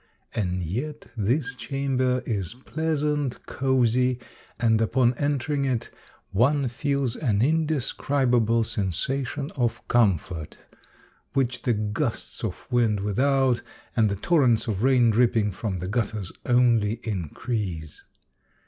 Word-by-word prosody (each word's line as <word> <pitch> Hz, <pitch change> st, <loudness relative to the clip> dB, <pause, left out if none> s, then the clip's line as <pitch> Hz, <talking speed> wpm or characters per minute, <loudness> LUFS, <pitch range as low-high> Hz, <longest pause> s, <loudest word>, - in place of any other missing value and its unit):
And 90 Hz, -4 st, -1 dB
yet 135 Hz, -, -4 dB
this 125 Hz, +5 st, 0 dB
chamber 130 Hz, -2 st, 0 dB
is 100 Hz, -4 st, -3 dB
pleasant, 150 Hz, -4 st, -1 dB
cozy, 125 Hz, -1 st, +2 dB, 0.4 s
and 115 Hz, -1 st, +3 dB
upon 120 Hz, +2 st, +3 dB
entering 145 Hz, 0 st, 0 dB
it, 125 Hz, -3 st, -1 dB, 0.4 s
one 135 Hz, +7 st, +3 dB
feels 140 Hz, 0 st, -1 dB
an 110 Hz, -9 st, +1 dB
indescriba 140 Hz, -4 st, +1 dB
ble 115 Hz, +1 st, +2 dB
sensation 120 Hz, -, -2 dB
of 120 Hz, -4 st, -1 dB
comfort, 90 Hz, -8 st, +1 dB, 0.8 s
which 130 Hz, -2 st, 0 dB
the 120 Hz, -, +1 dB
gusts 110 Hz, +5 st, -3 dB
of 105 Hz, -5 st, -4 dB
wind 115 Hz, -4 st, +2 dB
without, 130 Hz, +3 st, +2 dB, 0.3 s
and 110 Hz, -2 st, +4 dB
the 100 Hz, -, -1 dB
torrents 125 Hz, -, +3 dB
of 105 Hz, -4 st, -2 dB
rain 125 Hz, -2 st, +4 dB
dripping 115 Hz, -2 st, +3 dB
from 95 Hz, +1 st, -3 dB
the 90 Hz, +1 st, -4 dB
gutters 105 Hz, -3 st, -2 dB, 0.2 s
only 120 Hz, -4 st, +4 dB
increase. 95 Hz, -, -4 dB
120 Hz, 115 wpm, -25 LUFS, 105-135 Hz, 0.8 s, and